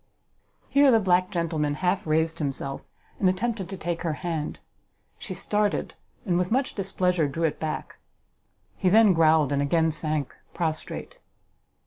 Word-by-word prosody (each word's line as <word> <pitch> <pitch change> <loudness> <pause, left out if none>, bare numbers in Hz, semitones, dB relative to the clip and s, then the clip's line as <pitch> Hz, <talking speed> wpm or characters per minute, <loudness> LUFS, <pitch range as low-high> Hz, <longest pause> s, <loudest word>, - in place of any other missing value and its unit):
Here 280 0 +5
the 230 -3 +5
black 185 -2 +2
gentleman 160 -4 -1
half 180 +2 -1
raised 160 +1 +1
himself, 135 -2 -3 0.4
and 190 - +4
attempted 195 0 -2
to 195 - -6
take 170 -1 -3
her 165 -2 -1
hand. 160 -3 -2 0.6
She - - -6
started, 210 -1 0 0.3
and 175 -3 +1
with 180 0 0
much 260 +3 0
displeasure 180 -4 0
drew 165 +4 -3
it 160 - 0
back. 155 -1 -4 0.8
He 185 - +2
then 215 0 +6
growled, 160 -3 +4
and 140 0 +1
again 160 +3 +2
sank 155 -2 -2 0.2
prostrate. 170 - -4
170 Hz, 145 wpm, -26 LUFS, 155-190 Hz, 0.8 s, then